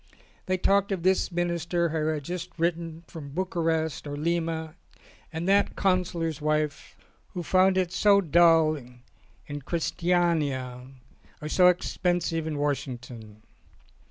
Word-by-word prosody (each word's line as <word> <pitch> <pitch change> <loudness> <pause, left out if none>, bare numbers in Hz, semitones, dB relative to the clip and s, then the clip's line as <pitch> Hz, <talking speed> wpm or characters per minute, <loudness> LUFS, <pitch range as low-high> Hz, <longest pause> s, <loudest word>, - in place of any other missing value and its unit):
They 185 0 +1
talked 200 +2 +2
of 185 -4 -2
this 190 +1 +2
Minister 170 0 0
who 155 -1 -1
had 155 -2 -1
just 180 +3 -5
written 165 -1 -2
from 155 -4 -9
Bucharest 165 -4 -1
or 145 - -4
Lima, 160 0 -2 0.6
and 165 +2 -4
that 200 +1 +3
Counsellor's 175 -5 0
wife 155 0 -1 0.4
who 175 - -3
found 185 +3 +3
it 180 -2 +1
so 200 +1 +4
dull 165 -3 +4
in 125 +2 -12
Christiania 160 -7 -1 0.5
or 150 - -6
so 180 +3 +5
expensive 175 -2 0
in 155 -2 -3
Washington. 125 -6 -4
165 Hz, 125 wpm, -27 LUFS, 150-180 Hz, 0.6 s, so